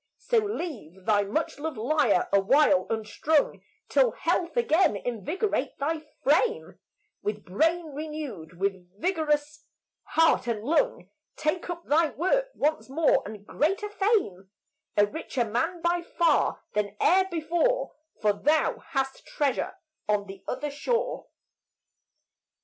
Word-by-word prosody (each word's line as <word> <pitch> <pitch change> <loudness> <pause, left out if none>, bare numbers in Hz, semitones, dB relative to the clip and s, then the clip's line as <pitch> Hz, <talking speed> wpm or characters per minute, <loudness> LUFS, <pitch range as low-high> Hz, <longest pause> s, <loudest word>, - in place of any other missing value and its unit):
So 475 -1 +2
leave 295 - -5
thy 210 -2 +4
much 285 +9 -2
loved 315 -3 -4
lyre 235 -5 +2
awhile 270 +8 +4
unstrung 225 +7 0 0.3
Till - - +3
health 345 +6 -1
again 380 - +3
invigorate 245 - -2
thy 315 +3 -1 0.2
frame; 380 - +1 0.4
With 210 -1 -4
brain 320 - 0
renewed, 280 - -6
with 190 -1 -3
vigorous 300 - 0 0.4
heart 325 -6 +2
and 220 -3 -2
lung 410 - 0 0.2
Take 310 +4 -1
up 345 -1 -5
thy 315 +2 +3
work 435 - +1
once 305 -1 0
more, 310 +3 +3
and 205 -1 -9
greater 390 - 0
fame 390 - 0 0.5
A 205 - +6
richer 245 +1 -3
man 325 +11 -2
by 345 0 +2
far 340 0 +1
than 210 -1 -1
e'er 375 +2 +4
before, 345 +9 0 0.3
For 210 -2 +3
thou 305 +9 +1
hast 270 -1 -3
treasure 285 +4 -1 0.3
on 205 -1 +2
the 195 -1 -11
other 295 +3 -3
shore. 465 - -2
300 Hz, 125 wpm, -27 LUFS, 215-340 Hz, 0.5 s, A